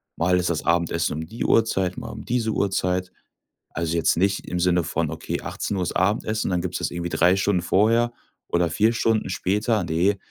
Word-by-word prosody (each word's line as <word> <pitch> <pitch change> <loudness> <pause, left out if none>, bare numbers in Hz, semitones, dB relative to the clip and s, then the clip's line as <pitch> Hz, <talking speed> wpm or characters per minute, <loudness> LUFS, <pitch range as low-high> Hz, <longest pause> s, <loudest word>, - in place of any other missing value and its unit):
Mal 90 +2 +2
ist 90 -1 0
das 80 - -1
Abendessen 85 -1 +1
um 80 +1 -4
die 115 +3 -5
Uhrzeit, 95 -5 +2
mal - - -6
um - - -8
diese 115 -2 0
Uhrzeit. 90 -2 0 0.6
Also, 85 0 -2
jetzt 80 - +2
nicht 100 +2 0
im 90 - -2
Sinne 90 -1 +2
von: - - -2
„Okay, - - -4
18:00 95 -3 -3
ist - - -3
Abendessen, 110 +3 0
und - - -2
dann 90 -1 +1
gibt's 90 -1 -3
das - - -2
irgendwie 85 0 -4
3 90 +2 +3
Stunden 95 -2 +1
vorher 115 +6 +2 0.3
oder 85 -1 +1
4 110 +8 +2
Stunden 115 -3 +1
später.“ 105 +4 0
Ne, 90 +5 +1
90 Hz, 200 wpm, -23 LUFS, 85-105 Hz, 0.6 s, 3